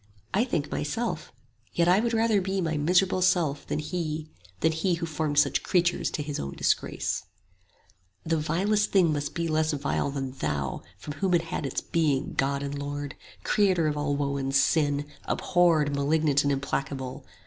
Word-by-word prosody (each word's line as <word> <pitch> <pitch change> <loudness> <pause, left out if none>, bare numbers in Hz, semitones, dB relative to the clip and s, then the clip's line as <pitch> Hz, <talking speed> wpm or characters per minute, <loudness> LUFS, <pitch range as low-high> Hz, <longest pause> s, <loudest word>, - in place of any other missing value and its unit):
I 215 +5 +3
think 155 - -2
myself; 225 +11 -2 0.4
yet 170 0 +3
I 180 +3 +5
would 235 +1 0
rather 225 -2 +3
be 190 +1 -1
My 165 -3 0
miserable 180 +5 +2
self 165 -6 +2
than - - -1
He, 155 0 -3 0.3
than 160 - +4
He 165 +3 0
Who 165 - -3
formed 155 -2 -2
such 145 -1 +4
creatures 175 -2 +1
to 150 - -3
His 145 -1 -4
own 70 0 -4
disgrace. - - 0 1.0
"The 165 0 +1
vilest 195 +7 +1
thing 175 -5 +4
must 145 0 -3
be 170 0 -1
less 155 0 +1
vile 140 0 -1
than 135 -2 -3
Thou 75 - -3 0.2
25 - - -17
From 150 - -5
whom 190 -2 +1
it 170 - +3
had 165 -3 -3
its 130 - -2
being, 145 -5 0
God 140 +1 0
and 140 0 -4
Lord! 145 0 -4 0.3
Creator 190 -5 +3
of 150 - 0
all 145 -1 0
woe 140 -1 -1
and 135 0 -2
sin! 145 0 +3 0.2
abhorred 165 -5 +2
Malignant 145 0 +2
and 140 - +1
implacable! 135 -1 -3
155 Hz, 180 wpm, -27 LUFS, 140-175 Hz, 1.0 s, I